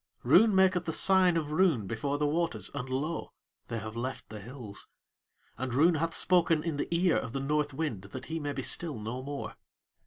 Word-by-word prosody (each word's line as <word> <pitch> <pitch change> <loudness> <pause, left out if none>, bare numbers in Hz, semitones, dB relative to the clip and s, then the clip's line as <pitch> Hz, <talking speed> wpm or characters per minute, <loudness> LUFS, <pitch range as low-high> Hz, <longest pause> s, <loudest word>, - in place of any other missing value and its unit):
Roon 220 -2 +5
maketh 185 -2 +4
the 160 - -1
sign 185 -1 +4
of 150 -2 -2
Roon 155 - +2
before 140 +7 -2
the 150 - 0
waters, 165 +3 -1
and 130 -2 -5
lo! 150 +6 -3 0.4
they 115 - -4
have 110 0 -6
left 130 +3 -5
the 110 - -7
hills; 115 -1 -9 0.7
and 130 -2 -2
Roon 165 +6 +5
hath 165 +1 0
spoken 170 -3 +3
in 165 -4 -2
the - - -2
ear 170 +1 +2
of 115 - -4
the 135 - -2
North 145 +2 0
Wind 135 -8 -3
that 100 - -8
he 165 +1 -4
may 145 -1 -3
be 135 -1 -4
still 160 -2 -1
no 110 +4 -5
more. 140 +1 -6
145 Hz, 205 wpm, -30 LUFS, 130-165 Hz, 0.7 s, Roon